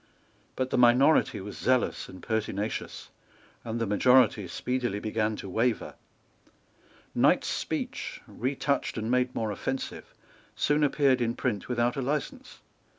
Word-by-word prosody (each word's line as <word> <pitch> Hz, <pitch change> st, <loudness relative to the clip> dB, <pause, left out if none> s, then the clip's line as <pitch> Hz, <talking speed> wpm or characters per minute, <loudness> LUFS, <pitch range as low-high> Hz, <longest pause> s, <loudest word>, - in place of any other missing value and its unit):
But 130 Hz, 0 st, -2 dB
the -, -, +2 dB
minority 125 Hz, +6 st, +5 dB
was 105 Hz, +2 st, -8 dB
zealous 130 Hz, 0 st, +1 dB
and 95 Hz, -, -12 dB
pertinacious; 110 Hz, -1 st, -3 dB, 0.5 s
and 115 Hz, 0 st, -4 dB
the 115 Hz, -, 0 dB
majority 110 Hz, -1 st, +4 dB
speedily 120 Hz, +3 st, -2 dB
began 110 Hz, 0 st, -1 dB
to 100 Hz, -, -8 dB
waver. 115 Hz, +5 st, 0 dB, 1.2 s
Knight's -, -, +3 dB
speech, -, -, -3 dB
retouched 140 Hz, +2 st, -2 dB
and 110 Hz, +1 st, -2 dB
made 125 Hz, 0 st, +1 dB
more 110 Hz, -2 st, -1 dB
offensive, 130 Hz, +6 st, -4 dB, 0.4 s
soon 150 Hz, +1 st, +2 dB
appeared 140 Hz, -3 st, +3 dB
in 115 Hz, 0 st, 0 dB
print 105 Hz, -2 st, -2 dB
without 120 Hz, 0 st, 0 dB
a -, -, 0 dB
license. 145 Hz, +3 st, -4 dB
120 Hz, 130 wpm, -28 LUFS, 110-130 Hz, 1.2 s, minority